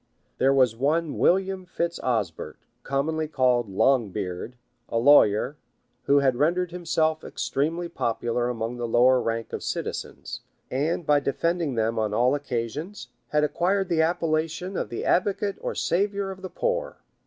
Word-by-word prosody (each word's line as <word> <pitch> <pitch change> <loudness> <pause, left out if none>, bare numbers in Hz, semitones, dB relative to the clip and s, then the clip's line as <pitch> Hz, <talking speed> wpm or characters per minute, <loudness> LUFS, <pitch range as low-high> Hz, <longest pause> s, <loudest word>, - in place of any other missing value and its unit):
There 135 - +4
was 130 -4 +3
one 150 +5 0
William 190 +1 +2
Fitz 170 -1 -2
Osbert, 110 -10 -2 0.2
commonly 155 +3 -1
called 125 -6 +1
Longbeard, 100 -2 0 0.4
a - - -1
lawyer, 125 0 +5 0.5
who 140 0 +4
had 130 -3 +2
rendered 175 +5 +1
himself 160 -2 0
extremely 165 +5 -2
popular 120 -5 -1
among 115 0 -3
the 120 -1 -3
lower 125 +2 +4
rank 115 0 -3
of - - -3
citizens; - - -5 0.3
and 155 +6 -1
by 145 -1 +4
defend 165 +5 -1
ing 145 -6 -2
them 115 0 0
on 105 -1 -1
all 125 +4 +3
occasions, 145 - -4 0.2
had 150 0 +1
acquired 190 +5 +1
the 165 -2 +2
appellation 165 +2 -1
of - - -2
the 120 - -4
advocate 200 +2 +1
or - - -3
savior 200 +1 0
of 190 0 -10
the 190 - -6
poor. - - -2
145 Hz, 150 wpm, -25 LUFS, 120-170 Hz, 0.5 s, lawyer